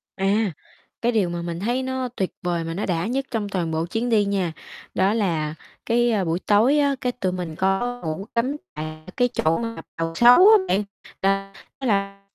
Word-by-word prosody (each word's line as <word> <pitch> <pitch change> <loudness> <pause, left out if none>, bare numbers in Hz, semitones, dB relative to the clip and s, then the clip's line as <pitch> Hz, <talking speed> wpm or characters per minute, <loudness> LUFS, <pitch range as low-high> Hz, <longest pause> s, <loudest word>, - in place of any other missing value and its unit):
À, 200 +1 +1 0.5
cái 240 - +2
điều 210 -6 +1
mà 170 0 -4
mình 170 0 -4
thấy 240 +6 -1
nó 260 -1 -2
tuyệt 190 - -1
vời 175 -2 -1
mà 165 0 -4
nó 195 - -2
đã 175 0 -1
nhất 265 +3 -1
trong 215 -4 -2
toàn 175 -4 -2
bộ 160 +1 -1
chuyến 225 +7 -2
đi 215 -3 +3
nha, 190 -4 -1 0.4
đó 190 +2 +2
là 165 -8 0 0.3
cái, 240 +1 +2
a, 210 -4 +1
buổi 165 0 -1
tối 225 +10 +3
á, 280 -1 +2
cái 250 - 0
tụi 195 -7 -2
mình 180 -3 -5
có 195 +8 0
ngủ 160 +4 -3
cắm 255 +5 +1 0.2
tại 155 +1 -6
cái 245 - +4
chỗ 160 -5 +1
mà 230 -1 -4 0.2
Bàu 165 0 -2
Sấu 240 +6 +8
á 440 - +9
bạn, 205 - +2 0.4
là 195 0 0 0.3
đó 265 - -3
là 200 -2 0
195 Hz, 210 wpm, -23 LUFS, 175-235 Hz, 0.5 s, á